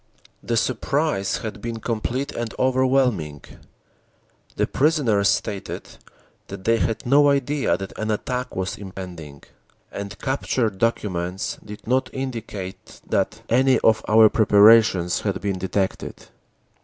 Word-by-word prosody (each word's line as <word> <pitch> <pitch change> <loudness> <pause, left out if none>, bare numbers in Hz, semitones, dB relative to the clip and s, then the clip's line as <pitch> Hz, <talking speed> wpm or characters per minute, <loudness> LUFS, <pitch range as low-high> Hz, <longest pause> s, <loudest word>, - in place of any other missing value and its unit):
"The 115 - -1
surprise 130 -2 0
had 105 -1 -6
been 115 -1 -4
complete 120 +4 -2
and 120 -2 -5
overwhelming. 130 - +1 1.1
The - - +1
prisoners 130 -10 +2
stated 100 -3 -3 0.6
that - - -8
they 115 +2 +3
had 115 +3 -2
no 145 +3 +5
idea 140 -8 +1
that 95 0 -8
an 110 - -2
attack 125 +4 -3
was 95 +1 -3
impending, 90 -7 -9 0.5
and 100 0 -6
captured 125 -6 -1
documents 95 -5 -2
did 105 0 -10
not 130 +3 +1
indicate 115 -8 -6
that - - -1
any 130 +3 +4
of 110 0 +3
our 110 +1 +7
preparations 105 -4 +5
had - - -2
been 95 -1 -2
detected. 95 +1 -2
110 Hz, 120 wpm, -23 LUFS, 95-130 Hz, 1.1 s, our